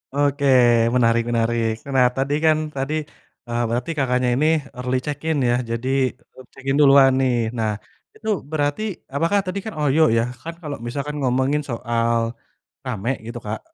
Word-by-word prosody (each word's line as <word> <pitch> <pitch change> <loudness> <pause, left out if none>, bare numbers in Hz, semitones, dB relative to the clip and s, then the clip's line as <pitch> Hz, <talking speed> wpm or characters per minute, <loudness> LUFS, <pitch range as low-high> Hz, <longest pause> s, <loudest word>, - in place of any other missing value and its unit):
Oke 145 0 +1 0.5
menarik 115 -1 +3
menarik. 115 -1 +1 0.2
Nah, 125 -1 +5
tadi 135 +2 0
kan 155 -1 +5 0.2
tadi, 135 +3 -2 0.5
eee, 120 0 -1
berarti 120 +7 -2
Kakaknya 125 -2 +1
ini 150 +4 +1 0.3
early 125 +1 -1
check-in 155 +1 -2
ya 120 - +3 0.2
jadi, 115 +3 -2 0.5
eb 130 - -13
check-in 135 0 -2
duluan 135 -1 +7
nih. 130 -2 +2 0.2
Nah, 110 -1 0 0.4
itu 220 - -6 0.2
berarti 145 +4 0 0.3
apakah, 165 +7 +2
tadi 185 +2 -3
kan 220 - -5
OYO 150 +1 +2 0.2
ya 115 - +3 0.2
kan 165 +1 -6
kalau 150 -3 -5
misalkan 145 +4 -4
ngomongin 130 +3 +1
soal 115 0 0 0.7
rame 120 -1 -3 0.2
gitu, 120 +1 -6
Kak, - - -3
135 Hz, 155 wpm, -22 LUFS, 120-145 Hz, 0.7 s, duluan